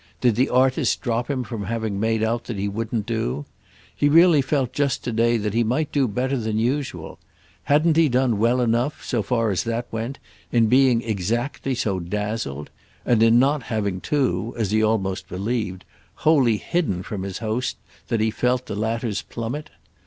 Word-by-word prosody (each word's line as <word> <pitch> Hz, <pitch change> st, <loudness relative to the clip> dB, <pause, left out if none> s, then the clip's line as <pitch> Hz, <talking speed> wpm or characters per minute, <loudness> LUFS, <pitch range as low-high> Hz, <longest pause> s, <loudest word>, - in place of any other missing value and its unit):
Did 120 Hz, -2 st, +3 dB
the 130 Hz, +4 st, +2 dB
artist 130 Hz, +1 st, +2 dB
drop 120 Hz, 0 st, -1 dB
him 130 Hz, -3 st, -1 dB
from 105 Hz, -2 st, -5 dB
having 110 Hz, -1 st, -2 dB
made 110 Hz, 0 st, +1 dB
out 115 Hz, +1 st, -1 dB
that 115 Hz, -, -5 dB
he 100 Hz, +1 st, -1 dB
wouldn't 110 Hz, +1 st, -3 dB
do? 90 Hz, -, -2 dB, 0.5 s
He 145 Hz, -, +2 dB
really 165 Hz, -1 st, +6 dB
felt 135 Hz, -2 st, -1 dB
just 145 Hz, -2 st, 0 dB
to 120 Hz, -, -2 dB
day 115 Hz, +1 st, +2 dB
that 105 Hz, -2 st, -2 dB
he 115 Hz, +1 st, +2 dB
might 135 Hz, +7 st, -1 dB
do 140 Hz, -3 st, +2 dB
better 130 Hz, +5 st, -1 dB
than 110 Hz, -2 st, -2 dB
usual. 120 Hz, -, -2 dB, 0.5 s
Hadn't 155 Hz, +2 st, +3 dB
he 165 Hz, -2 st, +5 dB
done 125 Hz, -4 st, +1 dB
well 120 Hz, +3 st, +3 dB
enough, 120 Hz, +5 st, 0 dB
so 120 Hz, -4 st, 0 dB
far 115 Hz, +1 st, 0 dB
as 95 Hz, -, 0 dB
that 115 Hz, +1 st, -2 dB
went, 115 Hz, +4 st, -4 dB, 0.3 s
in 115 Hz, -2 st, +4 dB
being 125 Hz, 0 st, +4 dB
exactly 115 Hz, +6 st, -2 dB
so 100 Hz, -6 st, -1 dB
dazzled? 105 Hz, -5 st, -4 dB, 0.3 s
and 120 Hz, -3 st, +3 dB
in 115 Hz, +1 st, +6 dB
not 140 Hz, +3 st, +3 dB
having 100 Hz, -5 st, -2 dB
too, 120 Hz, -6 st, 0 dB
as 110 Hz, -4 st, -1 dB
he 110 Hz, 0 st, +3 dB
almost 100 Hz, -4 st, 0 dB
believed, 100 Hz, -1 st, -3 dB, 0.3 s
wholly 135 Hz, -8 st, +3 dB
hidden 105 Hz, -, -1 dB
from 100 Hz, -1 st, -5 dB
his 95 Hz, 0 st, -4 dB
host 115 Hz, +3 st, -2 dB, 0.3 s
that 115 Hz, -3 st, 0 dB
he 110 Hz, 0 st, +2 dB
felt 125 Hz, +2 st, 0 dB
the -, -, -5 dB
latter's 110 Hz, -1 st, -2 dB
plummet? 125 Hz, +7 st, -5 dB
115 Hz, 180 wpm, -23 LUFS, 105-130 Hz, 0.5 s, really